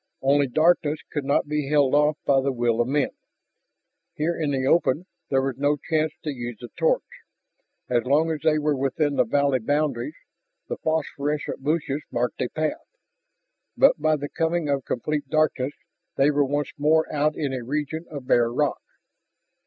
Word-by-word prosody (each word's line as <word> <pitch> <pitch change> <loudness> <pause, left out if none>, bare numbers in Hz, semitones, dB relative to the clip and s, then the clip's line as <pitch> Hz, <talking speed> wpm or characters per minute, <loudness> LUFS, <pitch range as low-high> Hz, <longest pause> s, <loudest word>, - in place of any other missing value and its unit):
Only 140 +1 +3
darkness 155 +2 +2
could 150 -3 -3
not 140 +1 +1
be 150 -2 -2
held 145 -3 +3
off 150 +1 +3
by 135 -1 +4
the 135 +1 0
will 120 -2 +1
of 120 - 0
men. 145 +1 +1 1.0
Here 165 +3 0
in 155 -3 -1
the 135 -2 0
open 160 +2 +2 0.2
there 135 -1 +2
was 135 -2 -2
no 145 +1 +1
chance 155 0 0
to 150 - -2
use 120 -3 -6
the 120 - -9
torch. - - +2 0.8
As 120 -1 +1
long 155 +5 +3
as 155 - -2
they 155 -1 +3
were 150 -1 +1
within 140 +2 0
the 125 -2 +3
valley 140 +2 +2
boundaries 150 - -1 0.5
the - - -4
phosphorescent 150 -2 -2
bushes 150 -1 -1
marked 120 0 -1
a 125 - -1
path. 155 -1 -3 0.9
But - - +5
by 155 - +3
the 145 -1 -4
coming 165 -1 -1
of 140 -2 0
complete 145 +3 -2
darkness 150 -3 +1 0.4
they 140 +2 +4
were 145 -1 +2
once 145 +2 -2
more 160 +2 +3
out 150 +1 +1
in 140 -3 -2
a 130 -2 -4
region 150 +5 -3
of 145 -4 -7
bare 120 -2 +3
rock. 145 +4 0
145 Hz, 175 wpm, -24 LUFS, 135-155 Hz, 1.0 s, But